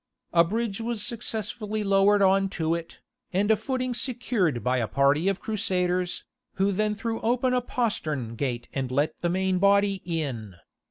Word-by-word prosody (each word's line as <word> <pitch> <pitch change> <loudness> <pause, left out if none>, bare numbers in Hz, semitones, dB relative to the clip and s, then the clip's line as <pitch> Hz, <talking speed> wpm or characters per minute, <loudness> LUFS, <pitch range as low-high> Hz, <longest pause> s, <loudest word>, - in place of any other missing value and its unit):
A 170 -1 +6
bridge 220 +3 -2
was 225 -2 0
successfully 215 -1 -3
lowered 200 +1 +4
on 195 0 +4
to 160 -1 +1
it, 170 -1 -6 0.3
and 200 +4 +2
a - - +6
footing 255 +3 -2
secured 230 - -1
by 125 +1 +1
a 115 - -1
party 140 - +2
of 195 -1 +1
Crusaders, 185 -4 -1 0.3
who 195 +1 +2
then 210 +2 0
threw 225 +1 -3
open 250 +2 +1
a 250 - +2
postern 155 - -2
gate 120 -2 -3
and 135 -2 -2
let 145 +5 +1
the 175 - +1
main 185 +1 +1
body 200 0 +3
in. 135 - -3
195 Hz, 165 wpm, -26 LUFS, 160-220 Hz, 0.3 s, A